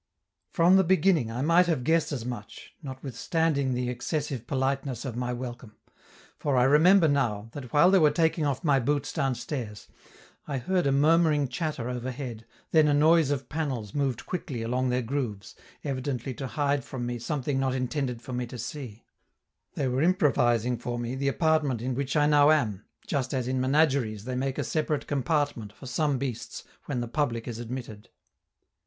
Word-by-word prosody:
From 175 +2 +5
the 190 - +5
beginning 180 -8 +3
I 120 +3 -3
might 170 +3 +4
have 155 -7 0
guessed 160 +4 +2
as 125 -5 -4
much, 120 -5 -8
notwithstanding 140 +1 -1
the 125 0 -1
excessive 125 0 -3
politeness 135 -2 -1
of 125 -4 -4
my 125 0 -2
welcome; 120 -3 -7 0.6
for 140 -3 0
I 125 - +5
remember 160 +6 +6
now, 115 -7 0
that 130 -3 -8
while 170 +5 +5
they 195 - +6
were 155 -3 +6
taking 160 +1 +1
off 140 -3 -1
my 145 -4 +3
boots 145 +3 -1
downstairs, 125 -6 -3 0.6
I 140 -2 -2
heard 175 +6 0
a - - +3
murmuring 150 0 +3
chatter 150 -4 -3
overhead, 125 -2 -5 0.2
then 155 -2 +5
a 145 - +3
noise 160 0 +4
of 140 -2 -2
panels 135 -10 -3
moved 135 -5 -1
quickly 135 -10 -4
along 125 +2 0
their 125 0 0
grooves, 115 -5 -4 0.3
evidently 130 -2 -3
to 130 +3 -5
hide 145 -1 0
from 125 -1 -5
me 120 0 -3
something 135 +1 -2
not 130 -1 0
intended 125 -2 -2
for 130 - -7
me 125 0 -2
to 125 - -8
see; 120 -2 -7 0.7
they 135 - 0
were 130 +2 0
improvising 125 - +2
for 120 0 -4
me 120 +1 -3
the 135 +1 -2
apartment 155 -4 +1
in 125 +3 -2
which 135 +2 -2
I 150 -1 +4
now 145 0 +5
am 110 -10 +1 0.2
just 135 -2 -2
as 125 -2 -1
in 130 0 0
menageries 130 -6 +2
they 130 +2 -4
make 130 +1 -2
a - - 0
separate 155 -2 -1
compartment 145 -6 -1
for 130 - -14
some 145 +2 0
beasts 125 -3 -5 0.2
when 130 -4 -2
the 120 - -3
public 120 -3 -1
is 115 -2 -5
admitted. 120 -3 -7
135 Hz, 180 wpm, -27 LUFS, 120-150 Hz, 0.7 s, remember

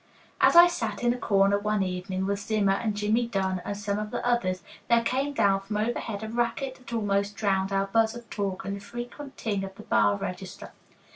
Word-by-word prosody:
As - - +6
I 345 0 +11
sat 225 - -2
in 240 0 +3
a - - -5
corner 200 -2 +3
one 210 -1 0
evening 185 +1 -3
with 200 0 -1
Zimmer 205 -1 +1
and 210 +1 -1
Jimmie 215 +3 +1
Dunn 190 -4 -1
and 200 - -4
some 205 0 -2
of 210 0 -4
the - - -4
others, 185 -7 0 0.3
there 235 0 +4
came 270 +4 0
down 200 -8 +3
from 200 +2 -4
overhead 220 -1 -2
a - - -4
racket 240 +4 -1
that 255 - -13
almost 200 -2 0
drowned 195 -2 0
our 195 0 +1
buzz 225 +3 +2
of 240 -1 -10
talk 195 -2 -3
and 200 0 -2
the - - -7
frequent 240 +6 -8
ting 205 -4 -2
of 195 0 -7
the - - -11
bar 105 -2 +3
register. 180 - -6
205 Hz, 215 wpm, -27 LUFS, 195-230 Hz, 0.3 s, I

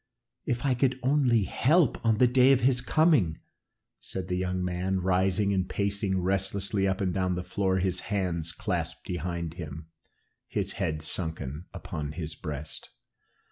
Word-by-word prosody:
"If 120 +2 -1
I 135 - +3
could 130 +1 +1
only 130 -5 +3
help 150 - +2
on 110 -2 +3
the 125 - +6
day 125 +2 +5
of 130 - +2
his 125 0 +3
coming!" 145 - +3 0.6
said 95 -1 -6
the 90 - 0
young 90 0 -1
man, 90 +2 -1
rising 95 +2 +2
and 95 -1 0
pacing 100 -1 0
restlessly 95 +1 +1
up 95 0 -1
and 95 -2 0
down 90 -1 0
the 90 - -3
floor, 95 0 0
his 95 -1 +1
hands 90 -5 -2
clasped 80 -3 -3
behind 85 -2 -3
him, 80 -2 -8 0.6
his - - -2
head 75 -1 -2
sunken 80 -2 -3
upon 75 -5 -5
his 80 0 -5
breast. 75 -3 -6
95 Hz, 155 wpm, -28 LUFS, 85-105 Hz, 0.6 s, the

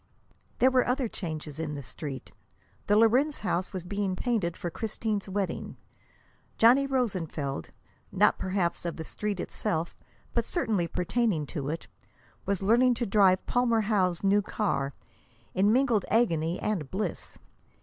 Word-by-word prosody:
There 260 +1 +5
were 255 -1 +3
other 250 0 +1
changes 155 -7 -6
in 155 -2 -3
the 140 - -6
Street. 135 0 -7 0.6
The 205 - +4
Lorenz 255 +7 +3
house 180 -2 -1
was 185 -4 -5
being 195 0 -2
painted 195 -6 -1
for 175 - -4
Christine's 215 -1 -3
wedding. 195 -1 -3 0.8
Johnny 255 +5 +6
Rosenfeld, 180 - -2 0.4
not - - +3
perhaps 185 -2 -1
of 170 -1 -3
the 160 - -5
Street 205 +3 -4
itself, 165 -1 -2 0.4
but 235 - +2
certainly 220 - 0
pertaining 180 -2 0
to 145 -4 -3
it, 165 +2 -4 0.6
was 195 -1 0
learning 240 +4 +4
to 240 - -1
drive 195 -3 +4
Palmer 240 -2 +2
Howe's 190 -5 +1
new 200 +1 +4
car, 145 -10 -1 0.6
in 200 +3 +3
mingled 240 -4 +3
agony 170 -7 +2
and 180 -10 -2
bliss. 205 +3 -4
200 Hz, 140 wpm, -28 LUFS, 170-230 Hz, 0.8 s, Johnny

